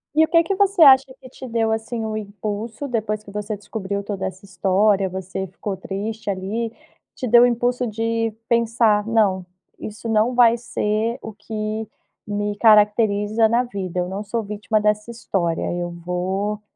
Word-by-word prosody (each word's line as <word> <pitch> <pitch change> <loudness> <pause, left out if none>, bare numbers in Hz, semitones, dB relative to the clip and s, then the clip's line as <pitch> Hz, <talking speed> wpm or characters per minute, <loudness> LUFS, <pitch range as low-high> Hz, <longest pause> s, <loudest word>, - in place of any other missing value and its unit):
E 315 - +6
o - - -15
que 335 0 +4
que 390 +3 -1
você 395 -3 +4
acha 265 -1 +7
que 255 - -13
te 260 0 -10
deu 225 -1 0
assim 225 +1 -3
o 215 - -3
impulso 215 +5 -5
depois 215 -3 -2
que 200 - -12
você 210 0 -4
descobriu 200 -1 -4
toda 195 -2 -3
essa 190 +1 -9
história, 195 +1 +2
você 190 +1 -5
ficou 195 +2 -5
triste 205 +3 -5
ali, 205 +4 -2 0.4
te 255 - -4
deu 240 +1 +7
impulso 245 +1 0
de 225 +1 -1 0.2
pensar 230 -2 +2
não, 205 -5 +2 0.4
isso 215 +2 -7
não 225 +3 +2
vai 235 -1 +6
ser 230 0 -1
o 220 - -8
que 215 +1 -4 0.4
me 205 0 -2
caracteriza 210 0 +4
na 235 +2 +2
vida, 190 -7 -4
eu 180 - -2
não 195 +3 -4
sou 225 +2 -3
vítima 210 +1 -1
dessa 210 +1 0
história, 185 -8 -2 0.2
eu 175 - -3
vou 185 +4 -3
215 Hz, 170 wpm, -22 LUFS, 200-230 Hz, 0.4 s, acha